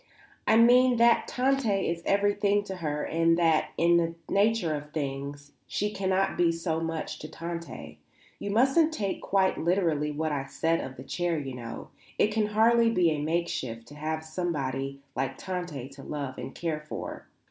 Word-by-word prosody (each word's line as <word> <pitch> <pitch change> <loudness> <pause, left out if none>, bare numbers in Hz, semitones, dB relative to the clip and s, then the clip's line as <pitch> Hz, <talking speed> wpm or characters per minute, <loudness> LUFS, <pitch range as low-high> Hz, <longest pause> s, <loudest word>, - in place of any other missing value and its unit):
"I 220 - +5
mean 245 +2 +6
that 235 0 +4
Tante 270 0 +1 0.2
is 170 0 -2
everything 205 0 +2
to 190 -2 -6
her 150 -3 -2
and 165 +1 +2
that, 165 -2 +3
in 170 +1 +4
the 165 -1 0
nature 205 -5 +2
of 150 0 -6
things, 145 -1 -4 0.2
she 210 +1 -1
cannot 190 0 0
be 170 -1 +4
so 165 -1 -2
much 165 -1 -4
to 155 - -7
Tante. 170 0 -7 0.4
You 205 - -4
mustn't 270 +9 +4
take 200 -6 -2
quite 190 -1 +1
literally 165 -4 +1
what 155 +1 -2
I 140 -2 -2
said 165 +4 0
of 130 - -7
the 130 - -9
chair, 175 +3 -1
you 135 -3 -4
know. 115 -2 -7 0.3
It 210 - +3
can 215 -1 +1
hardly 230 +2 +4
be 180 -7 +3
a 150 -1 -1
makeshift 150 -8 -2
to - - -12
have 155 +1 -3
somebody 140 -5 -3
like 135 +1 -2
Tante 175 -8 -5
to 135 0 -12
love 140 -2 -5
and - - -7
care 165 -3 -2
for. - - -6
165 Hz, 175 wpm, -28 LUFS, 150-200 Hz, 0.4 s, mean